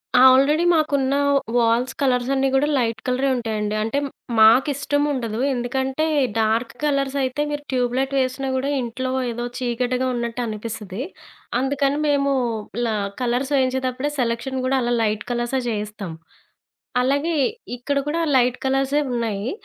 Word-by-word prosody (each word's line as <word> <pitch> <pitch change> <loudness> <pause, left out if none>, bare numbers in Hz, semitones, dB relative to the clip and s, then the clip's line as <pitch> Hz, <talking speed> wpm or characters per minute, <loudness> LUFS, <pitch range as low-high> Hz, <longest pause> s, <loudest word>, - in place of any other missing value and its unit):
ఆ! - - +7
ఆల్రెడీ 295 +6 +3
మాకున్న 280 -4 +1 0.4
walls 235 +2 +2
colours 250 -2 +1
అన్నీ 270 0 +2
కూడా 285 +2 +3
లైట్ 230 -3 0
కలరే 255 +2 +1
ఉంటాయండి. 215 -3 -2
అంటే 225 +6 -1 0.4
మాకు 225 +6 +7
ఇష్టం 285 +1 -1
ఉండదు 230 -4 -3
ఎందుకంటే 265 +4 -1 0.3
డార్క్ 225 +2 +1
కలర్స్ 275 -2 0
అయితే 260 +3 -1
మీరు 290 0 -4
ట్యూబ్ 245 -1 0
లైట్ 270 +1 0
వేసినా 260 +1 -1
కూడా 265 +2 -1
ఇంట్లో 255 +2 -3 0.2
ఏదో 240 +1 -4
చీకటిగా 250 +1 -1
ఉన్నట్టనిపిస్తది. 225 -3 -4 0.6
అందుకని 275 +2 0
మేము 280 -1 +2 0.5
ఇలా 230 -2 0 0.3
కలర్స్ 250 +3 0
వేయించేటప్పుడే 260 +1 0
సెలక్షన్ 240 +2 -1
కూడా 265 +1 +2
అలా 240 0 0
లైట్ 210 -1 0
కలర్సే 240 +2 -1
చేయిస్తాం. 210 -4 -4 0.9
అలాగే, 285 +6 +1 0.4
ఇక్కడ 280 +3 -2
కూడా 325 +3 0 0.2
లైట్ 250 0 +2
కలర్సే 270 +2 +1
ఉన్నాయి. 225 -2 -2
255 Hz, 135 wpm, -22 LUFS, 235-275 Hz, 0.9 s, ఆ